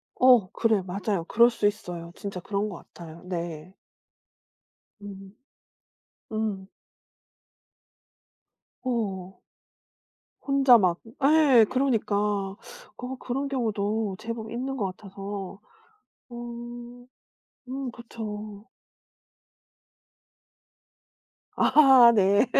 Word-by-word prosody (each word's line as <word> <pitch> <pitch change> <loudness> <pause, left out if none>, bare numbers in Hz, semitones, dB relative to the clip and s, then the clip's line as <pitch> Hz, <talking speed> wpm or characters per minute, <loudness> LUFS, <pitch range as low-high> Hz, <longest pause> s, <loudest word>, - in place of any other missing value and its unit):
어 250 -7 +5
그래 225 -3 +1
맞아요. 190 0 -2
그럴 235 +6 +5
수 220 -3 0
있어요. 175 -5 -5
진짜 200 -2 -6
그런 200 +3 -2
것 185 - -7 0.2
같아요. 165 -1 -11
네. 170 -1 -6 1.3
음 195 -1 -11 1.0
음. 215 -3 -3 2.2
어. 195 -7 -3 1.0
혼자 275 -3 +6
막 180 -5 +2 0.3
예 280 -6 +6
그러니까 255 -6 0
어 210 - -4
그런 270 +3 -3
경우도 220 -5 -1
제법 225 0 -6
있는 260 +3 -3
것 210 - -1
같아서 195 0 -8 0.7
어 240 0 -9 0.6
음 265 -1 -4
그렇죠. 215 -3 -8 2.9
아 265 -5 +7
네 200 +2 +4
215 Hz, 140 characters per minute, -26 LUFS, 195-245 Hz, 2.9 s, 아